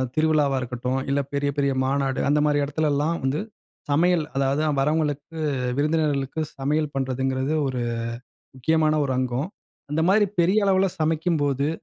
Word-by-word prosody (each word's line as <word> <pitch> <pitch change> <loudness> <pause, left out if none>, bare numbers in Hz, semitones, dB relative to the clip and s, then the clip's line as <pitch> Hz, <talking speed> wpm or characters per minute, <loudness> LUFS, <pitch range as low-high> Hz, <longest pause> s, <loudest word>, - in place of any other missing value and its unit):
திருவிழாவா 155 -3 +2
இருக்கட்டும். 125 +1 -2
இல்ல 140 +1 +2
பெரிய 140 0 0
பெரிய 140 -1 +2
மாநாடு, 135 0 0
அந்த 145 +1 +3
மாரி 145 -1 +2
இடத்துல 150 +2 0
லாம் 165 +3 0
வந்து 135 +3 0 0.5
சமையல், 170 +3 +3
அதாவது 135 +2 +1 0.2
வரவங்களுக்கு, 150 +2 -1 0.4
விருந்தினர்களுக்கு 150 -1 0 0.2
சமையல் 150 +2 0
பண்றதுங்கிறது 130 +1 -1
ஒரு 130 -2 -2 0.7
முக்கியமான 155 +3 +2
ஒரு 135 - -1
அங்கம். 130 +4 -1 0.4
அந்த 160 +2 +1
மாரி 205 +1 +4
பெரிய 195 +5 +3
அளவுல 195 0 +3
சமைக்கும்போது 155 -3 +1
145 Hz, 130 wpm, -24 LUFS, 135-160 Hz, 0.7 s, மாரி